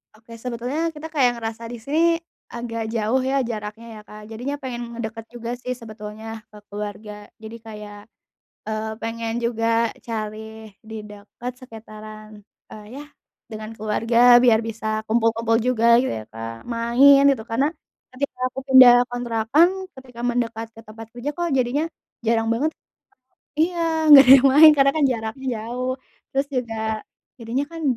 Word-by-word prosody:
Oke 230 +1 -14
sebetulnya 250 +8 -3
kita 310 0 -8
kayak 280 -6 +2
ngerasa 225 0 -6
di 240 - -7
sini 280 +8 -2 0.5
agak 235 -1 -5
jauh 230 +3 0
ya 270 +1 +1
jaraknya 215 0 -6
ya, - - -10
Kak, 210 0 -11
jadinya 245 +6 -5
pengen 255 -3 -6
ngedeket 225 -1 -6
juga 235 -1 -6
sih 250 +1 -6
sebetulnya 220 -1 -8
ke 210 - -14
keluarga 210 +1 -7 0.3
jadi 220 +1 -9
kayak, 210 -1 -9 0.6
eee, 220 0 -4
pengen 230 0 -4
juga 230 -1 +1 0.2
cari 220 0 -6
di 220 0 -11
dekat 210 +4 -9
sekitaran, 215 -3 -12 0.3
eee, 210 -1 -11
ya 285 - -7 0.5
dengan 215 +1 -7
keluarga 230 +3 +4
biar 240 -3 +4
bisa 220 -1 -3
kumpul-kumpul 225 0 +1
juga 235 -1 +4
yu 260 - 0
ya, 110 - -4
Kak, 115 +1 -8
main 245 +4 +5
gitu 270 -5 +2
karena 265 +5 +2 0.5
ketika 275 -1 -4
aku 255 - -7
pindah 260 -2 +10 0.2
kontrakan, 245 +5 +2 0.3
ketika 250 -2 -15
mendekat 235 -2 -2
ke 225 - -16
tempat 225 +1 -11
kerja 255 +5 -5
kok 345 -1 -2
jadinya 265 +2 +1 0.4
jarang 225 0 +1
banget 240 +8 0 0.9
iya 325 -1 +1
gak 275 -2 +10
ada - - +6
yang - - +5
main 310 +2 +10
karena 275 -1 +4
kan 300 +1 0
jaraknya 250 +1 -4 0.2
jauh, 250 +3 -3 0.4
terus 275 +1 +1
juga 250 -4 -3 0.6
jadinya 235 +3 -2
kan 330 -1 -8
230 Hz, 150 wpm, -22 LUFS, 220-255 Hz, 0.9 s, pindah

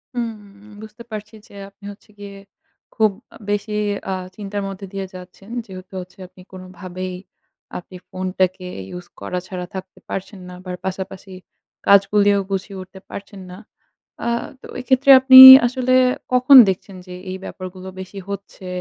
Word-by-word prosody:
হু, - - -2 0.6
বুঝতে 220 +2 -12
পারছি 215 +1 -8
যে - - -20 0.2
আপনি 200 0 -19
হচ্ছে 205 - -18
গিয়ে 200 -1 -10 0.6
খুব 215 -2 +2 0.4
বেশি 205 +1 -2 0.4
আ - - -1 0.2
চিন্তার 205 -1 -5
মধ্যে 195 0 -8
দিয়ে 195 -1 -4
যাচ্ছেন 185 +2 -13 0.2
যেহেতু 185 -2 -12
হচ্ছে 180 0 -15
আপনি 185 - -19
কোনোভাবেই 185 0 -8 0.6
আপনি 180 +1 -12
ফোনটাকে 185 0 -2 0.2
ইউজ 180 0 -9
করা 180 - -4
ছাড়া 180 -1 -6
থাকতে 190 0 -9
পারছেন 195 +1 -6
না 180 - -10
আবার 180 0 -7
পাশাপাশি 190 0 -7 0.5
কাজগুলিও 200 0 +4
গুছিয়ে 195 0 -4
উঠতে 185 +1 -13
পারছেন 200 0 -10
না। 180 - -10 0.7
আ - - -1 0.3
তো - - -12
এক্ষেত্রে 260 +2 +3
আপনি 260 0 +7 0.3
আসলে 255 0 -1 0.4
কখন 255 +2 +7
দেখছেন 190 +1 -5
যে 180 - -9 0.2
এই 185 - -5
ব্যাপারগুলো 185 0 -9
বেশি 190 +1 -9
হচ্ছে? 200 -1 -8
195 Hz, 145 wpm, -20 LUFS, 185-205 Hz, 0.7 s, আপনি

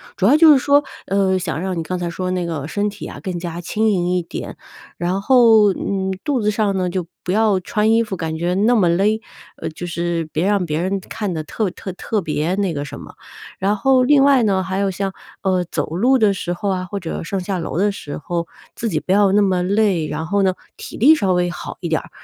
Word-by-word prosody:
主 190 - 0
要 270 +9 +6
就 315 -1 +8
是 - - +5
说， 285 +2 +4 0.3
呃， 195 -1 +2
想 165 -4 -3
让 185 -1 -2
你 165 - -2
刚 180 +2 -4
才 175 -1 -2
说 185 +2 -3
那 180 -1 -1
个 155 -3 -4
身 205 +1 -1
体 205 0 -9
啊 - - -8
更 185 -2 -4
加 170 -1 -5
轻 215 +5 0
盈 180 -4 +1
一 180 - +1
点， - - -7 0.4
然 180 +3 -1
后， 225 -4 +5
嗯， 190 0 -2
肚 285 -4 0
子 210 - +1
上 205 -2 0
呢 180 -1 0
就 180 -1 -3 0.2
不 180 - -2
要 210 -2 +3
穿 210 +4 0
衣 225 +1 +4
服 215 -4 -3
感 160 -2 -4
觉 175 +2 -1
那 225 +5 +3
么 190 -5 +3
勒， 200 +6 +2 0.4
呃， - - -5
就 170 +3 -6
是 170 -1 -2
别 160 +4 0
让 200 -2 +1
别 155 -1 -2
人 190 +2 -1
看 205 -4 -3
得 160 -2 -3
特 205 +6 -2
特 190 - -7
特 210 +3 -2
别 155 +2 -1
那 195 -3 0
个 145 -1 -3
什 140 0 -8
么。 - - -11 0.5
然 200 +2 +1
后 260 +4 +3
另 275 +1 +5
外 275 -2 +5
呢， 195 -3 +1
还 190 0 -3
有 200 0 +1
像 195 +1 -3 0.3
呃， 185 -2 +1
走 - - -2
路 255 +7 +4
的 215 -4 +3
时 175 -2 -3
候 200 +3 -3
啊， 185 -1 -1
或 205 - -4
者 165 - -4
上 195 - -3
下 185 0 -3
楼 165 - -4
的 205 +3 +2
时 150 -7 -7
候， 170 +2 -3 0.3
自 230 - -4
己 160 -8 -1
不 175 - -3
要 200 0 +4
那 205 - +4
么 185 -3 +1
累， 195 -4 +1
然 150 +2 -4
后 200 +4 +1
呢， 190 -1 +2 0.2
体 - - -9
力 285 +8 +6
稍 195 -11 +1
微 180 0 +1
好 175 - -7
一 170 - -3
点 160 - +1
儿， - - -14
190 Hz, 265 characters per minute, -20 LUFS, 175-210 Hz, 0.5 s, 就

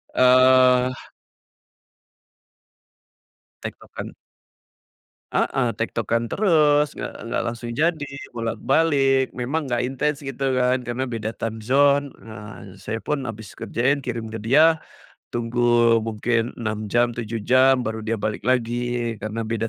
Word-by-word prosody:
Eee 130 0 +5 2.7
Tektokan. - - -8 1.2
Heeh, - - +1
tektokan 115 0 -1
terus, 150 - +3
nggak - - -6 0.2
nggak - - 0
langsung 120 +1 -5
jadi, 155 +4 0 0.3
bolak-balik, 135 +4 +1
memang 140 +6 -1
nggak 120 0 0
intens, 140 +3 -1
gitu 135 0 -6 0.2
kan, 125 0 +2
karena 120 +2 -3
beda 115 -3 -4
time 110 -1 -4
zone. 140 +3 +3 0.2
Ah, 105 -1 -10 0.2
saya 110 +1 -3
pun 150 +3 -2
habis 110 -2 -11
kerjain 135 +4 0
kirim 115 -3 -4
ke 110 -1 -7
dia, 155 +7 +4 0.5
tunggu 120 +1 -3 0.4
mungkin 115 +2 -1
6 110 -2 -4
jam, 120 +2 +2
7 115 -2 -5
jam, 130 +1 +4
baru 110 0 -3
dia 110 +1 -2
balik 105 0 -3
lagi 120 0 0 0.4
karena 110 +1 -4
beda 115 0 -2
120 Hz, 120 wpm, -23 LUFS, 115-135 Hz, 2.7 s, Eee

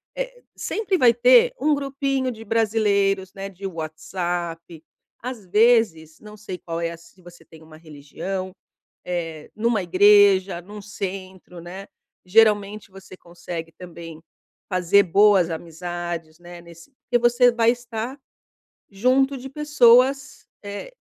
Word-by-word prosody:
eh, - - -6
sempre 410 -4 -2
vai 245 -7 +5
ter 245 +1 +5
um 300 +2 +2
grupinho 275 -1 -2
de 225 -1 -10
brasileiros, 200 -4 0
né, 195 0 -7
de 195 +1 -11
WhatsApp 165 0 -5 0.4
Às 245 -4 -7
vezes, 205 -6 +2
não 210 0 -13
sei 200 -3 -8
qual 165 -1 -6
é 170 - -1
a - - -7
s 170 0 -16
se 185 - -24
você 175 -2 -16
tem 160 0 -17
uma 155 0 -15
religião, 165 +5 -7 0.5
eh, 165 -3 -5
numa 225 -2 0
igreja, 195 0 +4
num 205 +3 -11
centro, 185 -3 -8
né. 185 +3 -9 0.4
Geralmente, 210 0 +2
você 190 -1 -14
consegue 170 -2 -8
também 170 -3 -11 0.5
fazer 185 +1 +3
boas 195 -1 +4
amizades, 170 0 -6
né, 175 0 -12
nesse 170 +7 -16
porque 240 - 0
você 240 +1 +4
vai 230 -1 +2
estar 240 +2 -5 0.7
junto 260 +7 +1
de 265 +2 -9
pessoas, 270 -2 +3 0.2
eh, 205 - -8
195 Hz, 135 wpm, -22 LUFS, 175-235 Hz, 0.7 s, vai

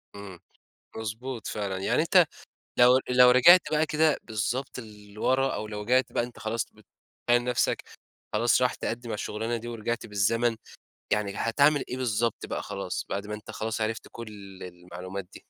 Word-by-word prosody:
إمم، 100 -4 -9 0.6
مضبوط 110 +2 -5
فعلًا، 100 -2 -3
يعني 95 - +1
أنت - - +5 0.5
لو 125 +1 +7
لو 125 0 +7
رِجِعت 175 +9 +8
بقى 155 +1 +3
كده 155 0 +2
بالضبط 120 +4 -3
لوَرا، 110 +5 -1
أو 105 - -4
لو 105 -1 -5
رِجِعت 125 +3 +2
بقى 120 - 0
أنت 120 0 -9
خلاص 110 +1 -2
بتْبيِّن 120 0 -3
نَفْسك 125 -1 0 0.5
خلاص 120 +3 +3
رايح 125 0 +2
تقدّم 120 +1 -4
على - - -2
الشُّغلانة 110 +3 -3
دي، 120 +1 -8
ورِجِعْت 115 0 -3
بالزمن، 115 +3 +1 0.6
يعني 105 -2 -1
هتعمل 140 +5 +3
إيه 125 - -3
بالضبط 115 -2 -1
بقى - - -4
خلاص، 100 -3 -4
بعد 100 +1 -3
ما 105 - -5
أنت 105 +1 -8
خلاص 110 +1 -3
عرفت 110 +1 -2
كُلّ 115 -1 -8 0.4
المعلومات 90 +2 -8
دي؟ - - -14
115 Hz, 165 wpm, -27 LUFS, 105-125 Hz, 0.6 s, رِجِعت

